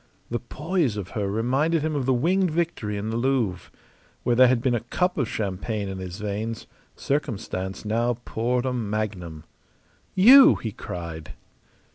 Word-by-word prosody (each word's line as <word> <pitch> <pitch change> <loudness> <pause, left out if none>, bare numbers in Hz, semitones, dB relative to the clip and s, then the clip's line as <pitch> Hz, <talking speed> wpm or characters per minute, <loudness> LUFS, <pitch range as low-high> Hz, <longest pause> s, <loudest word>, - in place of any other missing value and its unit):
The 120 - -1
poise 150 - -1
of 100 -2 -5
her 100 -2 -2
reminded 135 +10 +1
him 155 -1 -1
of 135 -3 -1
the 130 - +4
Winged 180 +8 +2
Victory 155 -11 -2
in 105 +2 -3
the 115 - -1
Louvre. 120 -8 0 0.5
Where 120 - +2
there 130 +1 +7
had 125 -1 +3
been 125 +1 +1
a 120 - +1
cup 180 - -1
of 135 -6 -1
champagne 100 +1 -3
in 95 -1 -5
his 90 -1 -6
veins 105 +2 -4 0.3
circumstance 105 -9 -3
now 115 +3 +1
poured 120 +3 -1
a 130 - 0
magnum. 100 -8 -3 0.7
"You!" 260 +8 +9
he 110 - -5
cried. 85 -5 -7
115 Hz, 160 wpm, -25 LUFS, 100-135 Hz, 0.7 s, You